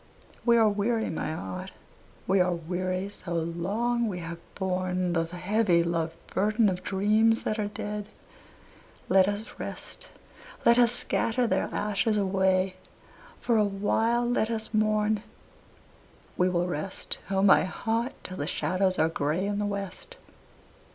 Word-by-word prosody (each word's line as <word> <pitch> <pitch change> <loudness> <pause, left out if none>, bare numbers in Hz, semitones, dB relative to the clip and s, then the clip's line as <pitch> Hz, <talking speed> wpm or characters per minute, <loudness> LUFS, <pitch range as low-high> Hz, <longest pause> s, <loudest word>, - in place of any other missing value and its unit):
We 235 0 +6
are 225 -1 +5
weary, 220 +2 0
my 160 - -3
heart, 95 - -6 0.5
we 195 +1 +3
are 180 -1 +3
weary, 185 +3 -2
so 185 -3 -7
long 200 +9 0
we 190 -4 -3
have 170 -1 -6 0.2
borne 185 -1 -1
The 165 -1 +1
heavy 180 +1 +1
loved 165 -1 -1 0.2
burden 215 +2 +3
of 180 -1 -3
dreams 215 +3 +2
that 215 - -1
are 210 - 0
dead, 210 0 -5 1.0
let 190 0 +5
us 205 +2 -2
rest, - - -7 0.6
Let 235 +1 +6
us 240 -1 +5
scatter 245 0 0
their 230 - 0
ashes 210 +1 0
away, 190 -1 +1 0.6
for 235 -2 +1
a 215 - +5
while 220 +4 +1
let 240 -2 +1
us 220 -1 -4
mourn; 215 0 +2 1.1
We 180 +1 +2
will 175 -1 +1
rest, 180 +2 -4
O 195 0 +1
my 200 - +6
heart, 225 +6 -2
till 185 - -7
the 145 - -3
shadows 185 +1 0
are 160 - +4
gray 160 +2 -1
in 205 0 -1
the 205 - 0
west. 200 - -6
195 Hz, 145 wpm, -28 LUFS, 180-220 Hz, 1.1 s, We